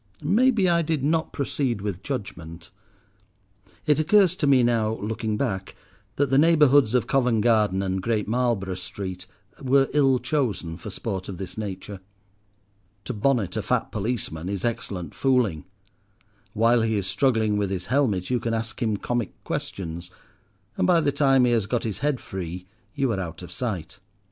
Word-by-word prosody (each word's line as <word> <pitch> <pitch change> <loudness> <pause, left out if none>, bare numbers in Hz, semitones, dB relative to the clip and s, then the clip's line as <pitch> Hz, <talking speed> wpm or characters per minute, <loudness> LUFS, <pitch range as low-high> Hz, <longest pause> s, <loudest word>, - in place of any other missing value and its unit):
Maybe 215 - +3
I 170 -1 +3
did 155 -4 -1
not 160 +2 +1
proceed 130 -6 -1
with 100 -3 -4
judgment. 85 - -6 1.1
It 150 -1 +3
occurs 185 +2 +4
to 145 - 0
me 135 -3 +5
now, 115 -2 +1
looking 110 0 -3
back, 95 -8 -3 0.4
that 140 -2 +1
the 135 - +5
neighbourhoods 145 -6 +5
of 120 -3 +2
Covent 125 -4 +2
Garden 105 -4 +2
and 95 0 -1
Great 110 0 -1
Marlborough 115 -5 0
Street 90 0 -6 0.3
were 135 0 +3
ill 135 -3 +4
chosen 125 - -2
for 100 - -8
sport 95 -1 -4
of 95 - -6
this 90 -1 -7
nature. 100 -1 -6 1.1
To - - -3
bonnet 115 -2 0
a - - 0
fat - - -1
policeman 100 -6 -3
is 100 0 -3
excellent 95 -8 -3
fooling. 125 - +1 0.9
While 115 +2 +3
he 110 -1 +1
is 100 -3 -1
struggling 110 +1 +1
with 100 -2 0
his 95 -2 -3
helmet 120 -8 0
you 125 - +2
can 115 -1 -1
ask 115 +2 -4
him 110 -3 +1
comic 120 0 -2
questions, 85 -1 -5 0.7
and - - +2
by 175 -2 +5
the 145 - +1
time 135 -3 +4
he 120 - +2
has 110 -4 +1
got 120 +2 -1
his 110 -3 -3
head 145 -1 0
free 90 -1 -6 0.3
you 135 -3 +1
are 100 - -1
out 85 -1 -6
of 90 - -9
sight. 90 -5 -4
115 Hz, 170 wpm, -25 LUFS, 95-135 Hz, 1.1 s, me